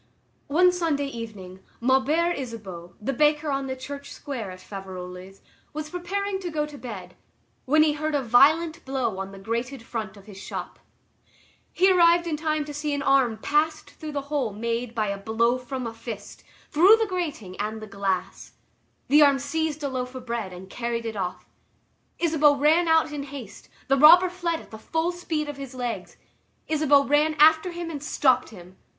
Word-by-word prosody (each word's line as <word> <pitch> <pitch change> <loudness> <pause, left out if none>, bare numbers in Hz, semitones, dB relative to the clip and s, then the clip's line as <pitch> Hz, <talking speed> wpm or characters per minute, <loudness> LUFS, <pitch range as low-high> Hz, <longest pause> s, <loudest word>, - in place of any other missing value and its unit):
One 360 +5 +5
Sunday 325 -5 0
evening, 215 -8 -8 0.2
Maubert 275 +8 +2
Isabeau, 195 -9 -7
the 250 +6 -2
baker 300 +2 +2
on 275 0 -1
the 260 - -3
Church 280 +2 -8
Square 245 -8 -6
at 185 0 -9
Faverolles, 185 -1 -9 0.3
was 305 0 -5
preparing 385 +3 -2
to 365 -2 -4
go 305 -2 -1
to 300 -1 -11
bed, 190 -7 -8 0.5
when 310 +4 +5
he 305 -1 +3
heard 305 0 -2
a 280 - 0
violent 315 +8 +4
blow 260 -7 -2
on 195 0 -5
the 195 - -11
grated 230 +5 -4
front 220 -4 -5
of 195 - -15
his 195 -2 -11
shop. - - -7 0.9
He 380 +1 +4
arrived 345 -1 +5
in 330 -3 -1
time 310 -1 -1
to 295 - -7
see 295 0 -2
an 280 - -3
arm 265 -5 +3
passed 300 +7 0
through 305 -2 -7
a - - 0
hole 280 -5 -2
made 230 +3 -3
by 215 -2 0
a 200 0 -3
blow 230 +4 +1
from 255 0 -5
a 230 - -4
fist, 225 -3 -8 0.3
through 370 +8 +7
the 445 - +1
grating 310 - -4
and 215 +1 -3
the 215 - -8
glass. 195 -2 -3 0.5
The 295 +2 +6
arm 280 -2 +6
seized 310 +2 -2
a - - 0
loaf 255 -1 -4
of 255 -1 -8
bread 230 -5 -3
and 180 +1 -10
carried 235 +2 -3
it 225 -1 -4
off. 185 -3 -4 0.7
Isabeau 305 -3 +4
ran 310 +5 +3
out 320 -1 +3
in 295 -1 -4
haste; 275 -6 -9 0.2
the 275 - +3
robber 350 +5 +8
fled 345 -2 -2
at - - -17
the 220 - -9
full 325 +8 -1
speed 325 -4 -3
of 290 -1 -6
his 275 -2 -8
legs. 245 -2 -5 0.5
Isabeau 295 -2 +4
ran 300 +2 +2
after 315 +4 +5
him 345 -1 -5
and 290 -3 -6
stopped 260 -4 +2
him. 185 -3 -14
275 Hz, 185 wpm, -25 LUFS, 225-310 Hz, 0.9 s, robber